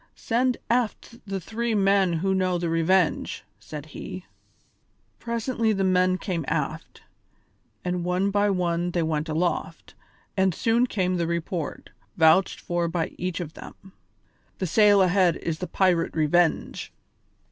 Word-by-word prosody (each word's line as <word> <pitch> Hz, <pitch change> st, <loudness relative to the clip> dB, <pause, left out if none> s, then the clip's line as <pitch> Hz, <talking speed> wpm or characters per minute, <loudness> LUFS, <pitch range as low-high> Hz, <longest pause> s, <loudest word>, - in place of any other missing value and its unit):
"Send 250 Hz, +2 st, 0 dB
aft 235 Hz, 0 st, -1 dB
the 195 Hz, 0 st, -3 dB
three 225 Hz, +4 st, -2 dB
men 195 Hz, -2 st, +3 dB
who 190 Hz, +4 st, 0 dB
know 185 Hz, -1 st, +1 dB
the 170 Hz, -1 st, -2 dB
Revenge," 165 Hz, +1 st, +1 dB, 0.2 s
said 150 Hz, +7 st, -8 dB
he. 185 Hz, -, -7 dB, 0.9 s
Presently 235 Hz, -1 st, -1 dB
the 195 Hz, -1 st, 0 dB
men 185 Hz, 0 st, +3 dB
came 180 Hz, -5 st, -3 dB
aft, -, -, -3 dB, 0.8 s
and 180 Hz, -1 st, -1 dB
one 180 Hz, +3 st, 0 dB
by 205 Hz, +1 st, +2 dB
one 175 Hz, -2 st, 0 dB
they 175 Hz, -1 st, 0 dB
went 155 Hz, 0 st, -1 dB
aloft, 170 Hz, +3 st, -2 dB, 0.4 s
and 190 Hz, -3 st, +2 dB
soon 235 Hz, +2 st, +2 dB
came 185 Hz, -5 st, 0 dB
the 170 Hz, -1 st, 0 dB
report, 170 Hz, -1 st, -4 dB, 0.3 s
vouched 165 Hz, +3 st, +4 dB
for 175 Hz, -1 st, -1 dB
by 165 Hz, -1 st, -1 dB
each 180 Hz, 0 st, -2 dB
of 165 Hz, -3 st, -6 dB
them: 190 Hz, 0 st, -13 dB, 0.6 s
"The 190 Hz, -, -2 dB
sail 205 Hz, +2 st, +5 dB
ahead 180 Hz, -1 st, +3 dB
is 160 Hz, -2 st, -4 dB
the 180 Hz, -, -4 dB
pirate 180 Hz, -3 st, +1 dB
Revenge." 160 Hz, +2 st, +1 dB
180 Hz, 140 wpm, -25 LUFS, 170-195 Hz, 0.9 s, sail